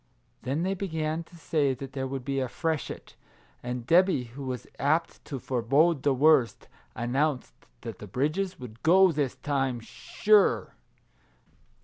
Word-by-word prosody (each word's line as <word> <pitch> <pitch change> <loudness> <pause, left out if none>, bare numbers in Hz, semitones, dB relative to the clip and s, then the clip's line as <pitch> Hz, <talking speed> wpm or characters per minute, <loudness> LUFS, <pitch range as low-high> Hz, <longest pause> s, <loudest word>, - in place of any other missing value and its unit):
Then 135 +7 -2
they 190 +1 0
began 160 -4 -2
to 175 - -18
say 145 -4 0
that 135 +1 -9
there 135 -1 -3
would 135 -1 -5
be 135 0 -1
a 130 - -1
freshet, 160 +3 -4 0.5
and 125 -1 -5
Debby, 175 -3 +4
who 140 +2 -7
was 125 -2 -4
apt 155 +4 0
to 140 - -5
forebode 135 +6 +2
the 145 - +2
worst, 135 -2 +3 0.3
announced 130 +3 -1 0.3
that - - -7
the - - -9
bridges 165 +8 -1
would 115 -3 -10
go 185 +3 +6
this 145 -4 -1
time, 135 -4 -1
sure 190 - +2
140 Hz, 145 wpm, -27 LUFS, 130-165 Hz, 0.5 s, go